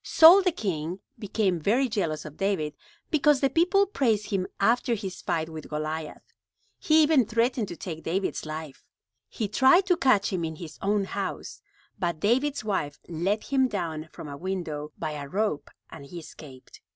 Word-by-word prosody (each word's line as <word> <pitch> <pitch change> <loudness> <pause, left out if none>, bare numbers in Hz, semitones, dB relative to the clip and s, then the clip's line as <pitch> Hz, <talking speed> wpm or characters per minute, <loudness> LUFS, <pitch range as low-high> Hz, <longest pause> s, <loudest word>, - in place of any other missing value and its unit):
Saul 340 +5 +8
the 365 -1 +2
king 180 - -3 0.2
became 195 -4 0
very 235 - +2
jealous 170 -10 -2
of 155 -1 -9
David 190 -7 -1 0.4
because 295 -2 +4
the 275 0 +1
people 365 +4 +3
praised 225 - 0
him 190 -2 0
after 235 +3 +2
his 195 -4 -6
fight 160 -1 -1
with 160 -1 -9
Goliath. 155 0 -4 0.6
He 315 0 +5
even 300 -4 +4
threatened 230 +1 0
to 175 - -7
take 160 -4 -6
David's 190 +4 -2
life. 155 -2 -7 0.5
He 215 - -3
tried 265 - +5
to 365 -2 +3
catch 215 -7 +3
him 175 -2 -1
in 160 -1 -3
his 160 0 -10
own 205 +1 +1
house, 190 - -5 0.4
but 170 -3 -1
David's 260 - +1
wife 170 -9 -2
let 185 +6 -1
him 265 -2 +2
down 165 -7 -4
from - - -9
a 140 - -6
window 165 -4 -4
by 155 -2 -3
a 145 -2 -6
rope 185 -4 -1 0.2
and - - -10
he 155 +5 -10
escaped. 145 -5 -12
195 Hz, 175 wpm, -27 LUFS, 160-245 Hz, 0.6 s, Saul